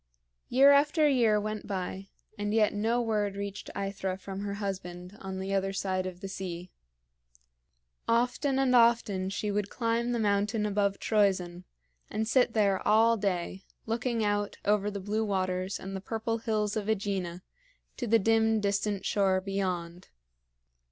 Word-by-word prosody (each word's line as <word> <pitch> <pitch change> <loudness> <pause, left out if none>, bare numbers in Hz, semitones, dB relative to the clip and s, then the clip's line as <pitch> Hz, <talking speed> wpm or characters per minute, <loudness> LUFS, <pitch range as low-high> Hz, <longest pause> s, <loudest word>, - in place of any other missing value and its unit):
Year 275 +3 +7
after 295 +2 +4
year 235 -6 +3
went 215 0 -4
by, 190 0 -4 0.3
and 205 +1 -2
yet 215 -2 +3
no 225 +4 +1
word 210 -3 0
reached 200 0 -5
AEthra 195 -1 -3
from 195 0 -7
her 200 0 -3
husband 185 -2 -5
on 190 -1 -5
the 190 +1 -3
other 195 0 0
side 185 -1 -1
of 180 0 -8
the 195 - -5
sea. 180 -2 -6 1.4
Often 250 +4 +1
and 265 -2 +3
often 230 -5 +3
she 205 +1 -2
would 205 0 -1
climb 235 0 -1
the 240 - 0
mountain 210 0 +1
above 200 -1 +1
Troezen, 185 -4 +1 0.4
and 220 +1 -2
sit 250 +2 +3
there 200 -3 +2
all 225 +2 +5
day, 190 -2 -2 0.2
looking 230 0 -1
out 205 0 -1
over 210 0 +2
the 200 -1 -5
blue 210 +3 -1
waters 185 -2 -1
and 195 +1 -6
the 190 - -4
purple 225 +2 -2
hills 215 -2 -1
of 215 -2 -2
AEgina 195 -4 -2 0.5
to 245 - -3
the 230 +1 +5
dim, 225 +1 +3
distant 200 0 -1
shore 190 -2 +2
beyond. 185 -3 -3
205 Hz, 155 wpm, -29 LUFS, 190-225 Hz, 1.4 s, Year